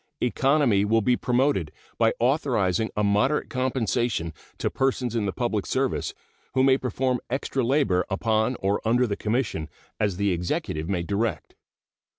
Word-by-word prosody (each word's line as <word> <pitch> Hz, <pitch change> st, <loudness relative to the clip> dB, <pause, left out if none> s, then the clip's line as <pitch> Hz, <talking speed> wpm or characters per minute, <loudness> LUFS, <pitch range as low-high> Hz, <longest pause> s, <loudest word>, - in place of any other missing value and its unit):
Economy 130 Hz, -4 st, +2 dB
will 110 Hz, +1 st, +2 dB
be 125 Hz, +2 st, +3 dB
promoted 125 Hz, -, +1 dB, 0.3 s
by 115 Hz, -1 st, +4 dB
authorizing 115 Hz, -, +1 dB
a 105 Hz, -, +2 dB
moderate 105 Hz, +9 st, +1 dB
compensation 120 Hz, -8 st, -1 dB, 0.2 s
to -, -, -1 dB
persons 130 Hz, -3 st, 0 dB
in 110 Hz, -3 st, 0 dB
the -, -, 0 dB
public -, -, -1 dB
service -, -, -1 dB, 0.4 s
who 130 Hz, -, +4 dB
may 135 Hz, 0 st, +5 dB
perform 130 Hz, 0 st, -1 dB
extra 135 Hz, +1 st, -1 dB
labor 115 Hz, -8 st, +2 dB
upon 110 Hz, +4 st, +1 dB
or 100 Hz, +1 st, +1 dB
under 120 Hz, +3 st, +3 dB
the 105 Hz, -4 st, -2 dB
Commission, 110 Hz, -, -2 dB, 0.3 s
as 100 Hz, -4 st, 0 dB
the 100 Hz, 0 st, +1 dB
Executive 85 Hz, -2 st, -2 dB
may 90 Hz, -3 st, 0 dB
direct. 105 Hz, +4 st, -2 dB
115 Hz, 150 wpm, -25 LUFS, 100-130 Hz, 0.4 s, may